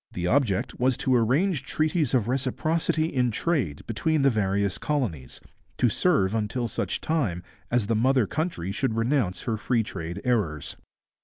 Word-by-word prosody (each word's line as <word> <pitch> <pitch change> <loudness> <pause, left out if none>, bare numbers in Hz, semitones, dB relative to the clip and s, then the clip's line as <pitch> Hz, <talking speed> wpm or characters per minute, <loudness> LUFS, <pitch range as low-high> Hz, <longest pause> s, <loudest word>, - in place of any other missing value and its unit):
The 90 - -3
object 110 -3 +1
was 130 0 +2
to 130 - +1
arrange 135 - +2
treaties 155 -1 0
of 115 -4 +1
reciprocity 155 +5 0
in 125 -6 +1
trade 120 - -1
between 155 +6 0
the 135 - +5
various 100 -2 0
colonies, 105 - -2 0.4
to 125 - +3
serve 110 - +2
until 115 +2 -1
such - - -3
time 115 - -1 0.3
as 120 -3 +1
the 115 +2 0
mother 130 +1 +3
country 145 - -3
should 115 +2 -1
renounce 115 -4 0
her 115 -4 -1
free 115 +1 +1
trade 85 -1 -6
errors. 100 - -1
120 Hz, 155 wpm, -26 LUFS, 100-140 Hz, 0.4 s, the